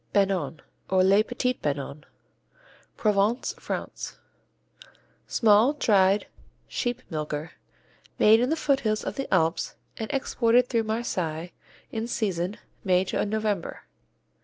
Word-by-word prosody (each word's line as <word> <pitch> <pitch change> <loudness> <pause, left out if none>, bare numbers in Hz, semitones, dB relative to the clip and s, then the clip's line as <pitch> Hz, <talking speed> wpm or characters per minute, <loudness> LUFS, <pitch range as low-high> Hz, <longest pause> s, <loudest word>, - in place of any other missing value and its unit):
Banon, 190 -6 +1 0.3
or 185 -1 +4
les 195 +2 +5
Petits 250 +2 -1
Banons 145 0 -3 0.9
Provence, 210 +3 +1
France, - - -5 1.1
Small, 225 +4 +4
dried, 200 -7 +3 0.4
sheep 245 0 -2
milker, 155 0 -3 0.7
made 220 +1 +6
in 250 +2 +1
the 320 - +2
foothills 270 -9 +1
of - - -3
the 270 0 -4
Alps 165 -3 +1 0.2
and 220 - -4
exported 250 -3 +2
through 230 -2 +1
Marseilles 180 -7 -2 0.4
in 225 +1 -3
season, 190 -4 -2 0.3
May 185 -2 +3
to 190 - -1
November. 210 -4 -2
210 Hz, 110 wpm, -26 LUFS, 180-235 Hz, 1.1 s, made